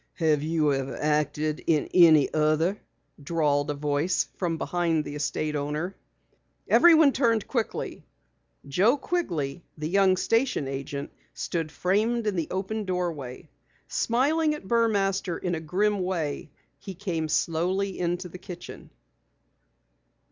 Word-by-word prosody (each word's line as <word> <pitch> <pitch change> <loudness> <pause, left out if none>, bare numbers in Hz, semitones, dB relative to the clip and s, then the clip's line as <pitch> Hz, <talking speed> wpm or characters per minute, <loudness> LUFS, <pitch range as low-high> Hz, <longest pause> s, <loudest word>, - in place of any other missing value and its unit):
"Have 155 -4 +2
you 155 -1 +1
ever 135 -1 -3
acted 150 0 0
in 155 -3 +2
any 160 -5 +6
other?" 155 +5 +1 0.4
drawled 145 -2 0
a 145 - -1
voice 145 +5 0
from 170 -3 -2
behind 165 -2 0
the 145 - -6
estate 150 +1 -2
owner. 150 +6 -3 0.7
Everyone 320 -4 +6
turned 230 -5 +1
quickly. 235 -4 -3 0.6
Joe 200 - +3
Quigley, 175 - -2
the 155 0 -3
young 190 +1 +3
station 225 - +1
agent, 140 +1 -5 0.2
stood 165 -3 -3
framed 215 +7 0
in 210 -2 0
the 165 -3 -1
open 200 +4 -3
doorway. 170 -9 -4 0.4
Smiling 300 +6 +1
at 245 - -11
Burmaster 200 -6 +1
in 180 - -3
a 165 - -1
grim 195 +6 0
way, 170 -6 -2 0.3
he 195 - -8
came 165 -5 -3
slowly 185 +5 0
into 175 +1 -1
the 180 +1 -10
kitchen. 180 -2 -10
175 Hz, 125 wpm, -26 LUFS, 150-200 Hz, 0.7 s, any